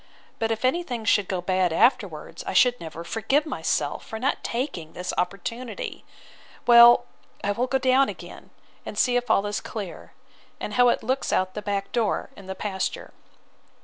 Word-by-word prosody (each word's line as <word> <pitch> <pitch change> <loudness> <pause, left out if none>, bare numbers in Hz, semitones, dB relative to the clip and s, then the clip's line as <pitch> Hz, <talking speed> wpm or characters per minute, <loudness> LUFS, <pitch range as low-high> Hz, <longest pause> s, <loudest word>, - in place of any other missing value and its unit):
But 225 - 0
if 225 +2 -1
any 300 +7 +2
thing 245 -9 -5
should 205 -3 +3
go 185 -2 -2
bad 185 -1 +1
afterwards, 235 +10 +1
I - - -2
should 245 -1 +4
never 165 0 -7
forgive 225 - 0
myself, 310 - -2
for 220 - -7
not 260 +5 -1
taking 230 - -4
this 180 +1 -4
opportunity. 205 +6 -4 0.6
Well, 240 0 +8 0.4
I 205 - +1
will 240 +5 -1
go 265 - +1
down 260 +1 +3
again, - - -10 0.3
and - - -8
see 250 -1 +3
if 245 0 0
all 195 - +3
is 205 0 -2
clear, 205 -6 -7 0.5
and - - -5
how 245 0 +5
it - - 0
looks 260 +4 -1
out 185 0 +1
at - - -28
the 210 - -5
back 200 -1 -3
door 230 -3 -1
in 195 - -13
the 190 - -5
pasture. 190 -1 -4
225 Hz, 180 wpm, -25 LUFS, 190-250 Hz, 0.6 s, Well